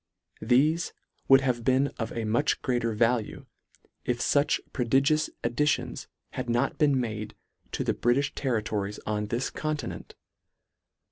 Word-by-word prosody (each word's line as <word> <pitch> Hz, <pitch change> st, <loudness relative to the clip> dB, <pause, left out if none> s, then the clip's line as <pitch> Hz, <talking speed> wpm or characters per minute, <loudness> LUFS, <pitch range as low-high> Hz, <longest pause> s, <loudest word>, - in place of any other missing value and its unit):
Thefe 150 Hz, +9 st, +2 dB, 0.3 s
would 135 Hz, 0 st, +7 dB
have 125 Hz, -3 st, 0 dB
been 130 Hz, +3 st, +3 dB
of 115 Hz, -, -3 dB
a 115 Hz, -1 st, -3 dB
much 120 Hz, +7 st, +1 dB
greater 120 Hz, -3 st, 0 dB
value, 115 Hz, 0 st, 0 dB, 0.6 s
if 125 Hz, -, 0 dB
fuch 145 Hz, +4 st, +2 dB
prodigious 135 Hz, +4 st, +2 dB
ad 120 Hz, 0 st, -1 dB
ditions 150 Hz, +3 st, 0 dB, 0.2 s
had -, -, -4 dB
not 120 Hz, +1 st, 0 dB
been 145 Hz, -3 st, +4 dB
made 110 Hz, -3 st, -4 dB, 0.4 s
to -, -, -1 dB
the -, -, +1 dB
Britiih 130 Hz, +4 st, +1 dB
ter 130 Hz, -5 st, 0 dB
ritories 105 Hz, -1 st, -3 dB
on 105 Hz, -1 st, -1 dB
this 120 Hz, +5 st, -2 dB
continent. 150 Hz, -5 st, -4 dB
125 Hz, 140 wpm, -27 LUFS, 115-140 Hz, 0.6 s, would